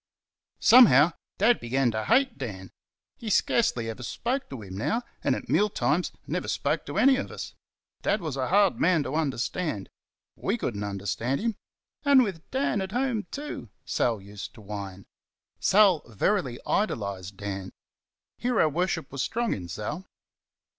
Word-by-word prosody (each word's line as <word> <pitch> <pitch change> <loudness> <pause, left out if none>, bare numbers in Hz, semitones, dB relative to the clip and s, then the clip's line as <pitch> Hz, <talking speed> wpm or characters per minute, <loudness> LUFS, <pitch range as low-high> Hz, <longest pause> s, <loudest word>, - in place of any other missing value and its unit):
Somehow, 175 - +7 0.3
Dad 230 +4 +4
began 125 +1 +1
to 110 0 -3
hate 260 +1 +3
Dan! 95 -8 -6 0.5
He 225 - -5
scarcely 185 - +2
ever 115 +2 -5
spoke 245 - -3
to 130 -6 -7
him 95 -1 -8
now, 225 - -1 0.2
and - - +2
at - - -7
meal 210 +1 +3
times 175 -2 0
never - - -3
spoke - - -1
to - - -4
any 265 0 +5
of 275 - -3
us. - - -7 0.5
Dad 210 - +1
was 155 -7 -4
a 130 -2 -1
hard 200 0 +3
man 170 -4 +3
to 140 - -5
understand. 145 - -2 0.4
We 210 - -1
could 120 - -3
n't 100 - -3
understand 100 +6 -2
him. 230 -1 -1 0.5
"And 280 -3 +6
with 185 -7 -5
DAN 265 -6 0
at 190 +1 -5
home, 245 -6 0
too!" 285 - -6 0.2
Sal 115 -3 0
used 100 0 -9
to 110 - -13
whine. 100 -2 -7 0.5
Sal 195 -5 +5
verily 125 - 0
idolised 100 - -2
Dan. 95 -2 -5 0.7
Hero 240 -9 +2
worship 165 -1 -1
was 140 -1 -3
strong 235 - 0
in 90 -3 -6
Sal. 145 - -5
150 Hz, 160 wpm, -27 LUFS, -, 0.7 s, Somehow